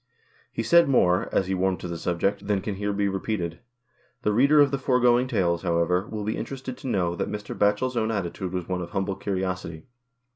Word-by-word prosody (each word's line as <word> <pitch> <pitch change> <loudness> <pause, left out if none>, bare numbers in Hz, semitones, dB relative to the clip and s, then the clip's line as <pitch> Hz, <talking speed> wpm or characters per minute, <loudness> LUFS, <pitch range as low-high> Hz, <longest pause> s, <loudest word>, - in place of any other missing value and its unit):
He 115 - -3
said 170 +3 +5
more, 90 -8 +3
as 95 - +2
he 95 - -2
warmed 95 0 0
to - - -5
the 85 - -4
subject, 95 +4 -1
than 100 -2 +1
can 105 - -3
here 100 +1 -2
be 100 0 0
repeated. 95 -3 -3 0.6
The 105 - +2
reader 140 +7 +5
of 145 -2 +5
the 140 - -1
foregoing 125 -1 +3
tales, 85 -7 +1
however, 90 +2 +1
will 105 -1 -5
be 110 +2 -2
interested 130 -1 -5
to - - -8
know 90 -7 0
that - - -2
Mr. 105 0 -5
Batchel's 105 +5 +1
own 110 -1 0
attitude 95 -3 -3
was 90 -2 -4
one 90 -1 -2
of 85 - -6
humble 95 0 -2
curiosity. 90 -4 -3
100 Hz, 210 wpm, -25 LUFS, 90-115 Hz, 0.6 s, said